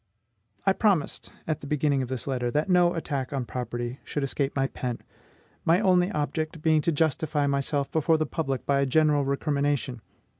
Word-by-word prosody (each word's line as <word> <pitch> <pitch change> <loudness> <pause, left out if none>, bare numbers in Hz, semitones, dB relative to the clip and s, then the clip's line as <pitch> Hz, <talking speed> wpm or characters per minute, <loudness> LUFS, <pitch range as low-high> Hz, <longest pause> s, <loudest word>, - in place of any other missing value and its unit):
I 195 - +5
promised, 195 -8 0 0.2
at 155 -2 -1
the 145 - -8
beginning 145 -1 +1
of 130 - -3
this 130 -3 -4
letter, 125 -3 -1
that 150 +7 0
no 175 -1 +4
attack 140 -5 -3
on 135 -3 -2
property 120 +1 -4
should 145 - -3
escape 140 0 -1
my 135 -1 +2
pen, 125 -3 -3 0.7
my 165 +3 +4
only 180 -2 +3
object 155 0 -3
being 155 -1 +4
to 170 - +1
justify 150 -1 +1
myself 140 0 0
before 160 +1 +2
the 155 - 0
public 135 -6 -3
by 140 -1 +2
a 140 - +2
general 150 +1 +3
recrimination. 140 -3 -1
145 Hz, 180 wpm, -27 LUFS, 135-160 Hz, 0.7 s, I